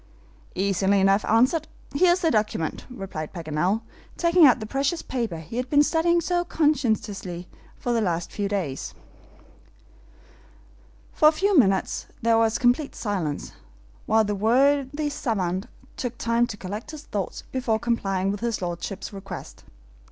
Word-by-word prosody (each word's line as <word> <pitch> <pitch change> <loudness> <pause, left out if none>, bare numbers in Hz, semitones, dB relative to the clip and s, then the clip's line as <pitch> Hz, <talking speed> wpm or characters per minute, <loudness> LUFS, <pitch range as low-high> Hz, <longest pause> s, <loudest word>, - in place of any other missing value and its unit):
"Easily 195 +1 +2
enough 195 +2 +3
answered. 255 +8 +3 0.3
Here 345 +5 +5
is 365 - -2
the 325 - +2
document," 210 -7 -1
replied 190 -10 -6
Paganel, 170 +5 -1 0.4
taking 340 -2 +6
out 250 - +4
the 215 - -5
precious 275 +8 -1
paper 230 -9 -3
he 160 +8 -8
had 250 0 -2
been 290 0 +5
studying 330 +3 +2
so 350 +1 0
conscientiously 220 - -1 0.3
for 245 - -2
the 230 - +2
last 175 -4 -1
few 205 -1 -2
days. 175 -10 -3 2.2
For 305 - +5
a - - +8
few 390 +5 +1
minutes 195 - +2 0.2
there 230 0 +4
was 225 -1 +2
complete 255 +4 +1
silence, 180 -9 -3 0.6
while 220 0 +4
the 205 -1 -1
worthy 275 +7 +2
SAVANT 190 -8 -2 0.3
took 245 -2 -4
time 235 +1 +1
to 205 - -7
collect 205 +8 -6
his 305 -1 -8
thoughts 200 -8 -4
before 250 -4 0
complying 195 -5 0
with 205 - -4
his 235 0 -1
lordship's 180 +3 -5
request. 195 -2 -9
225 Hz, 145 wpm, -25 LUFS, 195-280 Hz, 2.2 s, a